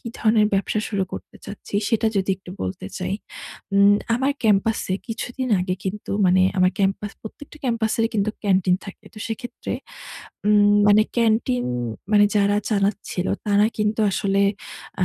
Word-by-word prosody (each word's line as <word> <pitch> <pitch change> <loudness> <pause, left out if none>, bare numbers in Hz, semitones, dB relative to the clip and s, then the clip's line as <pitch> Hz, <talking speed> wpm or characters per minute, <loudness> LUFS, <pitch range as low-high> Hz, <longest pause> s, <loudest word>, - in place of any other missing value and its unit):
কী - - -14
ধরনের 215 -1 +3
ব্যবসা 200 +2 0
শুরু 200 -3 -1
করতে - - -8
চাচ্ছি 205 0 -10
সেটা 225 -1 +1
যদি 195 0 +1
একটু 185 -1 -13
বলতে 95 0 -5
চাই। 195 - -2 0.6
উম 200 +1 +6 0.2
আমার 270 +3 +1
ক্যাম্পাসে 210 -2 +2
কিছুদিন 245 +3 -4
আগে 180 0 -1
কিন্তু 200 +2 -5 0.2
মানে 185 +1 +4 0.2
আমার 185 0 +4
ক্যাম্পাস 200 +1 0
প্রত্যেকটা 290 +7 -11
ক্যাম্পাসের 230 -2 0
কিন্তু 210 +1 +1
ক্যান্টিন 185 -2 +3
থাকে। 200 +1 -11
তো - - -10
সেক্ষেত্রে 230 +2 -6 0.7
উম 205 0 +5
মানে 210 +1 +6
ক্যান্টিন 220 - +2 0.5
মানে 205 0 +6
যারা 205 0 +3
চালাচ্ছিলো 200 -2 -1 0.2
তারা 205 0 +4
কিন্তু 210 +1 0
আসলে 195 +1 0 0.6
আ - - +5
205 Hz, 150 wpm, -22 LUFS, 195-220 Hz, 0.7 s, উম